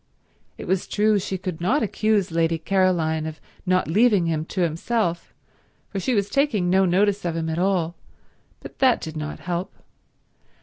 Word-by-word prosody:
It - - -7
was 185 +1 -1
true 210 0 +2
she 190 0 -3
could 180 -3 -5
not 255 +11 +2
accuse 215 -3 +1
Lady 165 0 +1
Caroline 160 -3 +1
of 155 0 -7 0.3
not 185 0 +2
leaving 205 +1 +3
him 160 -1 -1
to 185 - -3
himself, 170 +2 -1 0.6
for 200 - -3
she 245 +6 0
was 200 -1 +1
taking 210 -8 +1
no 190 +1 +4
notice 200 +3 +2
of 170 -2 -2
him 160 -1 -2
at 160 +1 -2
all, 180 -3 +1 0.7
but - - -11
that 255 -3 +4
did 160 -1 -7
not 155 0 -5
help. 175 +1 -3
185 Hz, 170 wpm, -23 LUFS, 165-205 Hz, 0.7 s, no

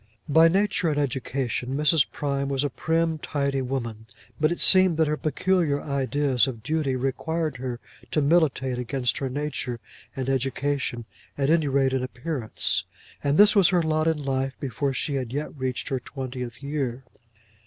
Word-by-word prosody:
By 160 +3 +6
nature 190 -1 +1
and 150 - -1
education 135 -1 -2
Mrs. 150 0 +3
Prime 140 -1 -2
was 135 0 0
a 145 - -1
prim, 160 +2 0
tidy 140 -2 -1
woman, 115 -4 -4 0.3
but 155 +1 +3
it 175 - -2
seemed 185 -3 +6
that 160 - +4
her 150 - +1
peculiar 155 0 +1
ideas 140 -3 +1
of 115 -5 -6
duty 150 -1 0
required 150 +3 -2
her 125 -1 -4 0.3
to - - +1
militate 140 -5 +2
against 125 0 -1
her 135 - -2
nature 130 -3 -3 0.4
and 130 -1 -3
education, 135 -2 -1 0.3
at 140 +1 +1
any 160 -3 +3
rate 135 -1 +2
in 130 - +1
appearance. 130 -1 -1 0.4
And 140 +1 +2
this 210 +1 +7
was 195 -3 +6
her 180 -3 +2
lot 155 0 +1
in 160 -1 +2
life 135 -2 -2
before 140 +1 -2
she 140 +2 -2
had 130 -4 -2
yet 145 +4 -4
reached 130 -2 -3
her 130 - -1
twentieth 125 -1 -7
year! 135 -3 -3
140 Hz, 165 wpm, -25 LUFS, 130-155 Hz, 0.4 s, this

